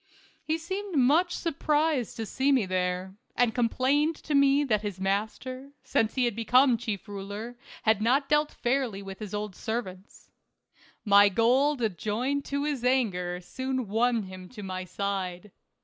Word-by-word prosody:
He 315 +1 0
seemed 380 +3 -5
much 310 +8 +3
surprised 300 -5 0
to 225 - -3
see 265 +6 +1
me 255 -7 +3
there, 185 0 -2 0.2
and 240 -2 +2
complained 260 +6 +1
to 300 - -3
me 280 0 +4
that 215 -7 +1
his 205 -3 -5
master, 225 +8 -3
since 220 0 0
he 255 -2 +2
had 235 -4 -1
become 250 +3 +4
chief 220 -3 -4
ruler, 205 +4 -6 0.3
had 220 -1 +3
not 265 +5 +2
dealt 300 +1 +2
fairly 240 -5 -1
with 195 -1 -8
his 210 -1 -6
old 205 -2 -4
servants. 200 -4 -6 0.7
My 200 0 +7
gold 235 - +2
joined 255 +7 -1
to 280 0 -2
his 290 -5 -2
anger 190 -9 +1
soon 260 +5 -3
won 230 +2 +1
him 185 -1 -10
to 215 -5 -9
my 185 -1 -4
side. 190 0 -4
230 Hz, 155 wpm, -28 LUFS, 200-275 Hz, 0.7 s, My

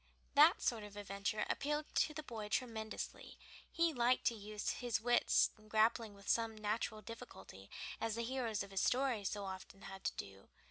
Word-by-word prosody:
That 305 +5 +7
sort 225 -3 +1
of 205 0 -10
adventure 200 +1 -1
appealed 295 +1 -1
to - - +3
the 310 0 -5
boy 220 -6 -6
tremendously; 220 -2 -3 0.3
he 335 -1 +2
liked 245 0 +3
to - - +4
try 225 - -9
to - - -10
use 210 0 -2
his 240 -3 -1
wits 240 +1 +4
in 215 - -18
grappling 220 0 +2
with 200 0 -15
some 225 -1 +2
natural 215 0 -2
difficulty, 95 - -10 0.3
as 225 -1 -1
the 235 - -1
heroes 235 -4 -1
of 200 - -11
his 195 - 0
stories 245 -6 +2
so 205 -1 -4
often 190 +1 -8
had 195 0 -8
to - - 0
do. 95 0 -8
220 Hz, 190 wpm, -38 LUFS, 205-240 Hz, 0.3 s, That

